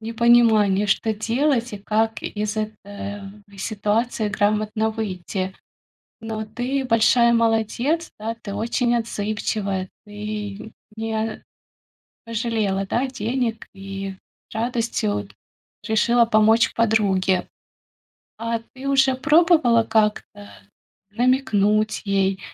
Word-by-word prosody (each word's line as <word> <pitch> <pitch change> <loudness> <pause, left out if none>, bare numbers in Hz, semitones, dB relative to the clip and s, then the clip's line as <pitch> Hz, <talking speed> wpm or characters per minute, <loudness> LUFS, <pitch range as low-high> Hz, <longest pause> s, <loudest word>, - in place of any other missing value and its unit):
непонимание, 225 -3 +4
что 220 +2 +1
делать 240 +3 0
и 205 - -5
как 220 +2 -1
из 210 0 -3
этой 215 0 -2 0.7
в 200 -1 -18
ситуации 215 +2 -1
грамотно 215 +2 0
выйти. 190 -3 -4 0.7
Но 220 -1 -4
ты 245 +5 -2
большая 235 0 +4
молодец, 230 +8 +1
да! 225 +2 -3
Ты 200 - -6
очень 235 +3 0
отзывчивая! 205 -4 -2 0.2
Ты 210 0 -6 0.2
не 220 0 -3 0.8
пожалела, 220 -4 -1
да, 240 +7 0
денег 235 -1 -2
и 195 0 -6 0.4
радостью 225 - -1 0.6
решила 235 +2 +3
помочь 220 0 +4
подруге. 195 -5 +1 0.9
А 230 0 -2
ты 265 +1 -6
уже 270 -1 +4
пробовала 305 -4 +4
как-то 210 -2 -1 0.6
намекнуть 215 -3 +1
ей 195 -1 +1
220 Hz, 95 wpm, -22 LUFS, 205-235 Hz, 0.9 s, непонимание